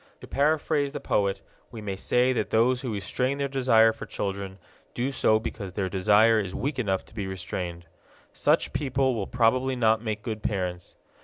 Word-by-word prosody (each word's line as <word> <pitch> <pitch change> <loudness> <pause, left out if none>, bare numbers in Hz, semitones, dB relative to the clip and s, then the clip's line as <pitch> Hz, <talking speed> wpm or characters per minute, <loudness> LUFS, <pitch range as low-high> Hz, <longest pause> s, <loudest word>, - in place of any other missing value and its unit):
To - - -9
paraphrase 145 0 +1
the - - -4
poet, 100 -1 0 0.3
we 115 - -9
may 100 -2 -4
say 125 +6 +2
that 105 -5 -1
those 120 +4 +2
who 125 -4 -3
restrain 125 +7 -1
their 140 0 -1
desire 125 -5 +4
for 105 -1 -9
children 100 -1 -4 0.4
do 125 +3 -1
so 110 -4 +3
because 100 -4 -6
their 95 -2 -2
desire 105 +4 +4
is 95 -3 -4
weak 135 +4 -2
enough 95 -5 -1
to - - -18
be 105 -3 -4
restrained. 90 -2 -5 0.5
Such - - +1
people 135 -2 +1
will 105 -5 -3
probably 125 +2 +2
not 110 -2 +2
make 110 -2 -4
good 110 -2 -4
parents. 90 -4 -3
110 Hz, 180 wpm, -26 LUFS, 100-130 Hz, 0.5 s, desire